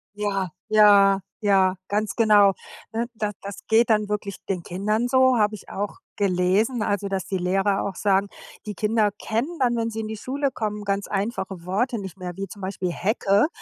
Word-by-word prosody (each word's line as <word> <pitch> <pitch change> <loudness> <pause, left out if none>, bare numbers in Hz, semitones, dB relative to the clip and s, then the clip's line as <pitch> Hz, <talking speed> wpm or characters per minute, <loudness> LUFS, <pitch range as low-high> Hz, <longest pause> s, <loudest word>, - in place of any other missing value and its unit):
Ja. 195 -3 -1 0.2
Ja. 200 -2 +6 0.2
Ja. 190 -2 +3
Ganz 210 0 -1
genau. 210 -4 +5 0.4
Ne, 230 +1 -1
da 210 -1 -2
das 200 0 -8
geht 230 +1 +4
dann 210 -1 +2
wirklich 205 -2 -3
den 185 -3 -2
Kindern 210 +7 -1
so, 260 -1 +4
habe 210 0 +2
ich 200 - -13
auch 205 +1 -4 0.2
gelesen 200 +5 +1
also, 205 -1 -1
dass 190 -2 -2
die 190 - -2
Lehrer 195 +2 +1
auch 195 - -4
sagen, 200 -1 +2 0.4
die 210 - -4
Kinder 215 0 +2
kennen 245 +10 -2
dann, 245 -2 +2
wenn 230 -1 -1
sie 225 0 -4
in 215 - -5
die 220 - -5
Schule 275 +5 -2
kommen, 210 -3 -4
ganz 200 0 -1
einfache 195 -3 -3
Worte 230 +7 0
nicht 190 -1 -8
mehr, 180 -1 -5
wie 195 0 -4
zum 200 +2 -11
Beispiel 185 -2 -3
Hecke, 200 - +2
205 Hz, 190 wpm, -24 LUFS, 195-220 Hz, 0.4 s, Ja